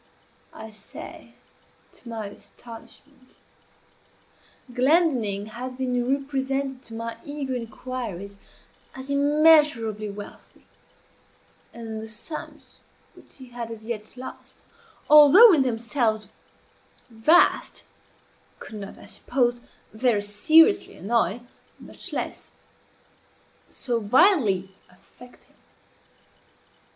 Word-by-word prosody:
I 220 0 -10
say, 210 -1 -12 0.6
to 240 - -14
my 225 -2 -5
astonishment. 245 +5 -14 1.4
Glendinning 250 - +2
had 250 +4 -8
been 255 +1 0
represented 270 -1 -3
to 225 - -9
my 230 0 -6
eager 285 -2 -5
inquiries 230 -5 -6 0.6
as 265 +1 -7
immeasurably 285 -7 +3
wealthy; 205 0 -12 1.1
and 225 -2 -7
the 220 - -9
sums 235 +8 -8 0.3
which - - -15
he 260 -2 -12
had 240 -1 -7
as 220 -1 -9
yet 220 0 -6
lost, 255 - -11 0.4
although 300 +9 +9
in 305 - +4
themselves 230 -3 -1 0.8
vast, 235 +10 +3 0.7
could 215 - -9
not, 200 -1 -9
I - - -14
supposed, 245 -2 -1 0.3
very 220 -2 +1
seriously 315 - +4
annoy, 230 +2 0 0.4
much - - -9
less - - -5 1.2
so 240 -3 -2
violently 220 - +3 0.2
affect 245 +7 -18
him. - - -28
240 Hz, 95 wpm, -24 LUFS, 220-275 Hz, 1.4 s, although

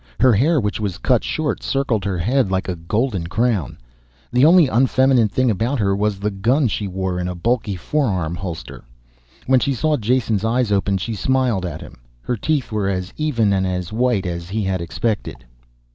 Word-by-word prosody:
Her 130 -2 +5
hair, 145 +9 +3
which 105 -3 -2
was 100 -5 -3
cut 120 +6 +1
short, 155 -2 -2
circled 125 -7 -1
her 95 -2 -1
head 120 +5 +1
like 95 0 -1
a 90 - -2
golden 95 +2 -2
crown. 110 - -1 0.6
The 125 +2 +4
only 170 -1 +6
unfeminine 130 -1 +3
thing 130 +3 +1
about 115 +8 -1
her 100 -4 +1
was 105 -1 -1
the 105 +1 -1
gun 120 +8 +1
she 105 0 -2
wore 95 -1 -3
in 90 - -2
a 90 - -4
bulky 110 +2 -1
forearm 95 - -1
holster. 85 -2 -7 0.6
When 130 0 +4
she 140 +1 0
saw 150 +5 +1
Jason's 115 -2 0
eyes 115 0 +1
open 100 -1 +1
she 110 +5 -4
smiled 120 -4 0
at - - -7
him. - - -12 0.2
Her 125 - -1
teeth 140 +2 -1
were 105 -2 0
as 90 -1 -3
even 120 -10 +1
and 95 -1 +1
as 90 +1 -3
white 120 -4 +1
as 85 -1 -4
he 105 +2 -2
had 95 -2 -1
expected. 95 - -3
105 Hz, 190 wpm, -20 LUFS, 95-125 Hz, 0.6 s, only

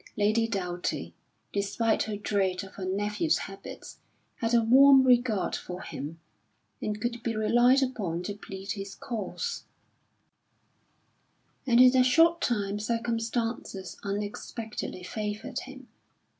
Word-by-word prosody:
Lady 215 +2 +2
Doughty, 180 -5 -3 0.4
despite 205 +3 +1
her 215 -1 -2
dread 195 -2 0
of 190 - -11
her 190 - -6
nephew's 210 - 0
habits, 195 0 -9 0.4
had 230 0 -1
a 235 -1 +4
warm 270 +3 +7
regard 245 -5 +3
for 180 0 -6
him, 160 +4 -7 0.6
and 210 0 -2
could 235 +1 -3
be 225 -1 -2
relied 240 +5 +4
upon 190 -10 -2
to 205 - -3
plead 195 -1 -7
his 195 -1 -5
cause; 245 - -4 2.0
and 240 -1 +5
in 255 0 +8
a 255 - +6
short 330 +6 +4
time 205 -3 0
circumstances 230 -3 -2
unexpectedly 205 0 -5
favoured 210 +2 -4
him. 265 -1 -11
215 Hz, 120 wpm, -28 LUFS, 200-240 Hz, 2.0 s, in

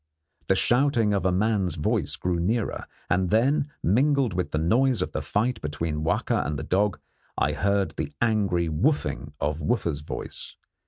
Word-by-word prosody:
The 95 - +3
shouting 115 - +2
of 100 - +1
the 95 - +1
man's 95 -1 +1
voice 75 - 0
grew 90 -1 -1
nearer, 110 +6 -1 0.2
and 90 0 +1
then, 140 - +2
mingled 130 - +2
with 90 0 -1
the - - -2
noise 115 +6 +2
of - - -5
the - - -3
fight 110 +2 -1
between 75 +1 -3
Wahka - - +1
and 75 0 -3
the 80 - -5
dog, 100 +4 +1 0.4
I - - +2
heard 100 0 +1
the - - -4
angry 100 -7 +1
'wooffing' 75 - -1
of 75 +2 -1
Wooffa's 85 -5 -1
voice. 75 - -7
95 Hz, 165 wpm, -26 LUFS, 85-115 Hz, 0.4 s, The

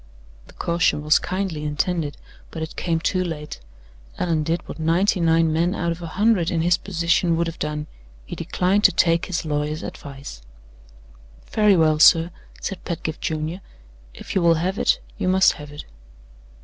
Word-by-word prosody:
The - - -16
caution 170 -3 0
was 150 0 +4
kindly 185 -5 -3
intended; 150 +1 -2 0.3
but 160 - -5
it 160 - -7
came 165 -2 -1
too 185 +2 0
late. 150 -4 -6 0.6
Allan 165 -3 0
did 165 +3 -2
what - - -8
ninety 175 +5 +2
nine 165 -1 +3
men 170 +4 +1
out 170 -4 -1
of 170 +1 -6
a 170 - -5
hundred 205 -5 +3
in 165 - 0
his 175 0 +4
position 170 -1 0
would 170 - +1
have 165 0 -6
done 150 0 -3 0.4
he - - -7
declined 190 +3 0
to - - +8
take 165 0 +2
his 170 -3 -3
lawyer's 150 +1 -2
advice. 140 - -9 1.1
"Very 210 -2 +4
well, 155 -2 +3
sir," 165 +1 +6 0.3
said 195 - -5
Pedgift 160 -2 -4
Junior; 160 +4 -3 0.5
"if - - -8
you 190 - +2
will 170 -1 +4
have 185 +5 -2
it, - - +2 0.2
you - - -1
must 190 +1 +5
have 150 -1 -10
it." 145 - -9
165 Hz, 175 wpm, -22 LUFS, 155-180 Hz, 1.1 s, to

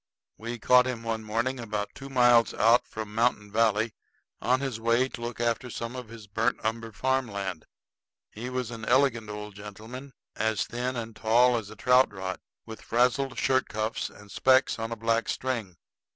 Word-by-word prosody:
We 115 +2 -5
caught 125 +3 +5
him 120 -3 -4
one 115 -1 -2
morning 115 +5 -1
about 105 -3 -3
two 135 0 -9
miles 120 -3 +4
out 115 +3 +4
from 110 -1 -7
Mountain 110 -2 +1
Valley, 110 0 +2 0.5
on 130 +1 +2
his 135 -5 -3
way 115 +3 +2
to 120 - -8
look 120 0 -5
after 120 +1 0
some 115 +1 -5
of 125 -2 -6
his 115 -2 -10
burnt 110 +4 0
umber 115 0 -2
farm 130 +5 0
land. 95 -5 -5 0.7
He 120 +4 -6
was 125 -2 -3
an 115 -1 -7
elegant 120 -5 +2
old 105 0 -6
gentleman, 110 +7 -9 0.2
as 110 -1 0
thin 125 +2 -3
and 115 -2 -5
tall 120 +3 +4
as 110 -3 -3
a 110 - -10
trout 125 +4 +4
rod, 95 -2 -5 0.3
with 110 -1 -9
frazzled 125 +3 +1
shirt 130 0 +2
cuffs 110 +1 -2
and 105 -1 -15
specs 130 -2 +3
on 115 +1 -3
a - - -2
black 115 +1 0
string. 115 -9 -2
115 Hz, 180 wpm, -28 LUFS, 110-125 Hz, 0.7 s, caught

